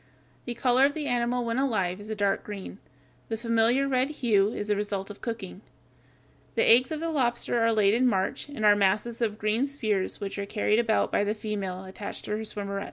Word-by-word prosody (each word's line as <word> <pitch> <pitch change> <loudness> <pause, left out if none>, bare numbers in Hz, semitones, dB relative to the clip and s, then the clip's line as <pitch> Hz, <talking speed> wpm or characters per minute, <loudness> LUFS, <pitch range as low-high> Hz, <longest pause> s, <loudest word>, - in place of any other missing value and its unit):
The 240 - -4
color 255 +2 +4
of 285 - -6
the 305 -2 -3
animal 245 -1 0
when 230 +2 -1
alive 200 -8 0
is 210 - -10
a 220 - -2
dark 200 -1 0
green. 200 -1 -8 0.5
The 225 - -2
familiar 230 +3 +2
red 260 0 +1
hue 220 -8 +2
is 205 - -4
the 210 - +3
result 200 -1 -3
of 205 - -13
cooking. 215 -5 -6 0.9
The - - +3
eggs 250 +4 +6
of 310 - -2
the 330 +1 -2
lobster 240 -4 0
are 230 0 +3
laid 210 -2 +3
in 250 +3 +3
March, 195 +4 -1
and 230 -7 -3
are 205 0 +7
masses 205 +4 0
of 215 -2 0
green 215 +3 0
spheres 215 -9 -1
which 200 0 -5
are 200 - -3
carried 215 +1 +1
about 225 -2 +1
by - - +2
the 210 +1 -1
female 200 -4 -4
attached 190 +2 -7
to - - -6
her 210 - 0
swimmerets. 200 -2 -4
220 Hz, 215 wpm, -27 LUFS, 205-245 Hz, 0.9 s, are